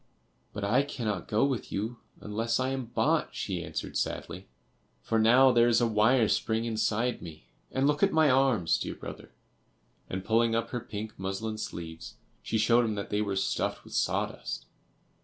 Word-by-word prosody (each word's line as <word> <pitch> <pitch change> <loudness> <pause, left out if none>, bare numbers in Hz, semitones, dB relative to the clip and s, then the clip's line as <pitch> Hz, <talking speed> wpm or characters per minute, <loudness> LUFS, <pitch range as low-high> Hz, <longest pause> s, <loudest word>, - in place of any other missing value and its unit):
"But 100 - -6
I 115 +7 +3
cannot 115 -9 -3
go 110 +5 +2
with 135 -4 -2
you 110 +4 -3 0.2
unless 115 +3 -1
I 130 0 0
am 135 -1 -3
bought," 115 - 0
she - - -3
answered, - - -5
sadly, 90 +3 -3 0.6
"for 115 - +1
now 125 +4 +6
there 120 -1 +5
is 120 - +4
a 120 - +3
wire 110 +2 +4
spring 110 +1 0
inside 115 +1 0
me; 80 -2 -10 0.3
and 135 +1 +1
look 145 0 +2
at 200 - +4
my 160 -1 +4
arms, 130 - +3
dear - - -4
brother;" - - -9 0.8
and 95 0 -4
pulling 115 0 +3
up 115 - -1
her 125 - -2
pink 110 -1 -7
muslin 95 +3 -3
sleeves, 80 -4 -7 0.3
she 110 - -1
showed 115 +3 +4
him 110 -2 -1
that 100 - -5
they 105 0 +1
were 100 -2 -1
stuffed 95 - -1
with - - -13
sawdust. - - -2
115 Hz, 175 wpm, -29 LUFS, 105-125 Hz, 0.8 s, now